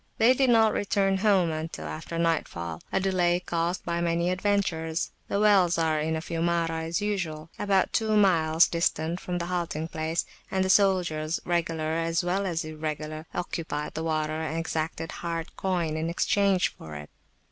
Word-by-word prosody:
They 230 +3 +6
did 265 0 +2
not 225 -2 +5
return 195 -1 +1
home 190 -4 +3
until 155 - -5
after 75 - -5
nightfall, 85 - -1
a - - +2
delay 180 -2 +2
caused 175 0 -2
by 170 0 -1
many 170 +1 +1
adventures. 180 -4 0 0.2
The 200 - -1
wells 195 -5 +4
are 160 -2 +1
in 160 +1 0
a 160 - -2
Fiumara, 165 -1 -1
as 170 +5 -1
usual, 165 -6 -3
about 195 -2 +2
two 215 -1 +2
miles 165 -5 +4
distant 165 0 0
from 180 -2 -3
the 170 - -2
halting 170 -3 -2
place, 160 +1 -1 0.2
and 190 0 +1
the 190 - +3
soldiers, 175 -6 +2
regular 165 -2 -1
as 165 +1 0
well 190 +3 0
as 165 -3 -2
irregular, 155 0 -5
occupied 165 -4 -3
the 160 - -3
water 155 -1 -1
and 160 0 -3
exacted 165 0 -3
hard 165 -1 -5
coin 175 -5 -1
in 160 +1 -1
exchange 195 +2 +2
for 80 -1 -10
it. 75 0 -9
170 Hz, 170 wpm, -27 LUFS, 160-185 Hz, 0.2 s, They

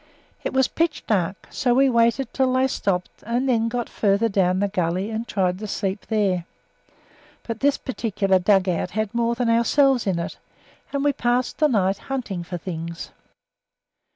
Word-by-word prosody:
It - - -2
was 265 -1 +3
pitch 330 -2 -1
dark, 190 -2 -1
so 245 -2 +1
we 270 +1 +5
waited 235 +1 +2
until 260 -1 +1
they 260 +1 +3
stopped, 190 -8 -2
and 240 +4 -1
then 230 -3 +2
got 240 0 -2
further 205 +2 +1
down 185 -2 +2
the 200 - +2
gully 185 +1 -1
and 225 +2 -3
tried 185 -2 0
to 215 - -5
sleep 195 0 -3
there 195 -6 +1 1.0
but 230 -1 -5
this 285 0 +2
particular 205 -7 0
dug 190 0 +3
out 180 0 0
had 215 -1 -1
more 235 0 +1
than 240 0 -1
ourselves 240 +2 +3
in 185 -3 +1
it, 170 - -5 0.5
and 280 -1 -1
we 290 -1 +3
passed 245 -1 0
the 305 - +5
night 195 -6 +1
hunting 240 -9 -4
for 175 +1 -5
things. 170 -1 -6
220 Hz, 175 wpm, -23 LUFS, 190-250 Hz, 1.0 s, we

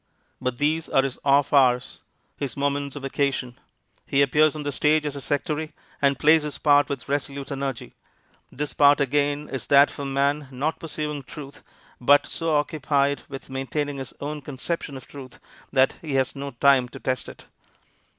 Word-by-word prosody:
But 125 -1 -2
these 155 +3 0
are 135 - +3
his 135 -2 -4
off 140 +1 +3
hours, 125 -3 +3 0.4
his 140 -1 -5
moments 140 0 -1
of 145 - -7
vacation. 135 -2 -2 0.5
He 140 +1 +3
appears 150 +3 +3
on 150 - -5
the 145 - -2
stage 150 +2 +2
as 145 -1 -3
a 140 - -6
sectary, 150 +3 -2 0.3
and 140 -1 +3
plays 155 +3 +5
his 150 -1 -5
part 145 -1 +4
with 140 -2 -5
resolute 140 0 -3
energy. 135 -3 -4 0.6
This 150 +2 -4
part 145 0 +5
again 145 +1 0
is 135 - -5
that 140 +1 +6
of - - -12
a 140 - -3
man 140 +1 0
not 140 +5 -2
pursuing 150 -2 -4
truth, 140 +2 -10 0.4
but 145 +3 +5
so 165 -1 -2
occupied 145 -1 +1
with 135 -1 -9
maintaining 140 +2 -3
his 135 -1 -7
own 150 +1 -5
conception 145 +1 -5
of 130 - -12
truth 135 -3 -11 0.3
that 130 0 +3
he 150 -4 -4
has 135 +1 +1
no 140 0 -5
time 135 -3 +3
to - - -10
test 130 -4 -2
it. - - -13
140 Hz, 180 wpm, -24 LUFS, 135-150 Hz, 0.6 s, that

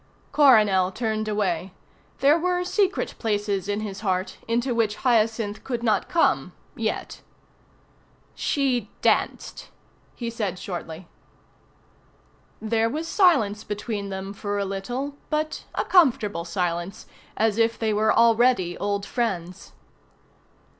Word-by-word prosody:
Coronel 210 -10 +5
turned 215 0 -2
away. 190 -4 -1 0.5
There 280 +3 +6
were 360 +1 0
secret 390 +2 0
places 205 -3 -1
in 205 +1 -1
his 200 -2 -5
heart 190 -2 -2
into 240 +2 0
which 220 -3 +1
Hyacinth 225 -3 +1
could 240 -3 -3
not 215 -4 +1
come 340 -2 +2 0.2
yet. - - -3 1.1
"She 255 -7 0
danced," - - 0 0.5
he 235 -1 -4
said 205 -6 -3
shortly. 175 -2 -7 1.5
There 225 +1 +1
was 315 +6 -4
silence 225 - +3
between 210 -1 -4
them 195 0 -5
for 205 0 -3
a 200 - -1
little, 245 +9 -4
but 310 0 -2
a - - 0
comfortable 230 - +3
silence, 175 0 -3 0.3
as 220 0 +1
if 230 0 +2
they 220 -1 0
were 215 +1 +3
already 230 -6 +3
old 200 0 -1
friends. 185 -7 -3
215 Hz, 120 wpm, -24 LUFS, 195-240 Hz, 1.5 s, There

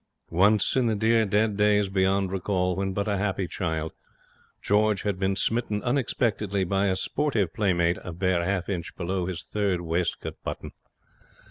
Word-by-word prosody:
Once, 100 +7 +3
in 130 -2 +3
the 110 - +1
dear, 110 +1 +3
dead 105 +1 +2
days 105 -1 +3
beyond 95 0 +1
recall, 90 -1 0
when 95 +1 -1
but 100 +2 -2
a 100 -1 0
happy 100 -2 -1
child, 80 -3 -3 0.7
George 105 -1 +2
had 100 -3 -1
been 95 0 +1
smitten 105 +1 -1
unexpectedly 110 -6 0
by 95 +2 +1
a 95 - +1
sportive 105 - 0
playmate 85 -4 +1
a 90 - -6
bare 90 0 0
half 95 0 -1
inch 90 -4 -4
below 90 0 -2
his 90 -2 -4
third 100 -4 -1
waistcoat 85 +1 -2
button. - - -5
95 Hz, 160 wpm, -26 LUFS, 90-105 Hz, 0.7 s, Once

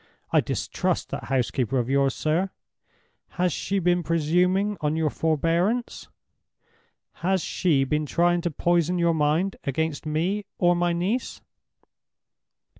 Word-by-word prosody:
I - - +4
distrust - - -2
that - - -5
housekeeper 130 -1 0
of 120 -2 0
yours, 135 0 +2
sir! 165 +5 0 0.9
Has 180 -2 +1
she 200 - -2
been 175 -1 +2
presuming 180 +5 +1
on 150 0 0
your 160 -2 0
forbearance? 170 - 0 1.1
Has 185 0 0
she 155 -7 +1
been 150 +3 -1
trying 175 +3 +2
to 175 - -1
poison 175 +2 +1
your 170 -1 +2
mind 160 +5 +1
against 155 +2 -2
me 180 +7 -1
or 175 -1 +3
my 175 0 +1
niece?" 190 +9 -2
170 Hz, 125 wpm, -25 LUFS, 150-180 Hz, 1.1 s, I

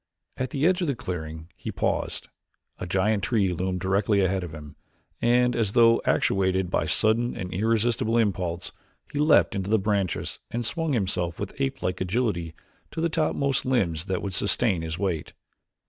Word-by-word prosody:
At 130 - -3
the 145 -1 -1
edge 180 +1 +3
of 175 - 0
the 140 - 0
clearing 80 -5 -6
he - - -6
paused; - - -2 0.5
a - - -4
giant 100 +3 +1
tree 100 -3 +1
loomed 90 +1 -2
directly 100 +2 +2
ahead 95 0 +1
of 85 - -6
him 75 -2 -10 0.5
and, 125 +1 +3
as 110 -4 0
though 115 -1 +5
actuated 95 -1 +1
by 80 - +1
sudden 110 +8 +2
and 90 -1 -5
irresistible 115 +3 +1
impulse, 90 -6 -1 0.4
he 145 - -2
leaped 150 -5 +4
into 95 -1 -3
the 110 - +4
branches 100 -3 -1
and 120 0 -3
swung 165 +4 -1
himself 90 -6 -1
with 100 - -4
apelike 135 -10 -2
agility 90 -5 -1 0.3
to - - -6
the 165 +1 +1
topmost 140 -4 0
limbs 95 -11 0
that 95 -2 -2
would 100 -2 -3
sustain 100 -1 +2
his 80 0 -4
weight. 90 -5 -2
100 Hz, 170 wpm, -26 LUFS, 90-120 Hz, 0.5 s, though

